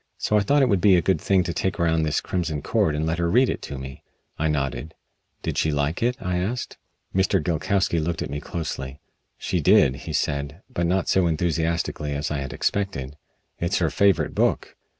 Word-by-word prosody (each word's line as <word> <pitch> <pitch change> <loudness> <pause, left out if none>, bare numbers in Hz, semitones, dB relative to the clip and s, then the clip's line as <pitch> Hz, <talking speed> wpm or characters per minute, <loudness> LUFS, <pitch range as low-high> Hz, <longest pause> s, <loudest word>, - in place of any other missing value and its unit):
So 105 - 0
I - - +6
thought 140 +7 +3
it - - +4
would 100 -6 +2
be 100 -1 +6
a 85 - +4
good 95 +4 +1
thing 95 -2 +3
to 85 0 -3
take 95 +1 -2
around 80 -1 +2
this 75 -2 0
'Crimson 80 -5 -2
Cord' 75 - +1
and 75 +1 -1
let 80 +1 -1
her 85 0 +1
read 125 +7 +4
it - - -5
to 70 - -5
me." 65 0 -8 0.3
I 80 - 0
nodded. 75 +1 -2 0.5
"Did - - -1
she 80 - +2
like 75 +2 -1
it?" 125 +2 +1
I 90 -1 -2
asked. 110 +7 -3 0.3
Mr. 95 0 +2
Gilkowsky 85 +2 0
looked 80 +1 -2
at - - -6
me 70 - -3
closely. 75 -4 -5 0.4
"She - - -1
did," 65 0 +5
he 70 - -7
said, 70 +5 -2
but 85 -10 -1
not 95 +2 +1
so 95 -2 +3
enthusiastically 80 -2 -1
as 75 +2 -2
I 75 - -1
had 70 -1 -5
expected. 75 -9 -2 0.4
"It's 85 +3 0
her 80 -4 +1
favorite 100 +1 +2
book. - - 0
85 Hz, 210 wpm, -24 LUFS, 75-95 Hz, 0.5 s, I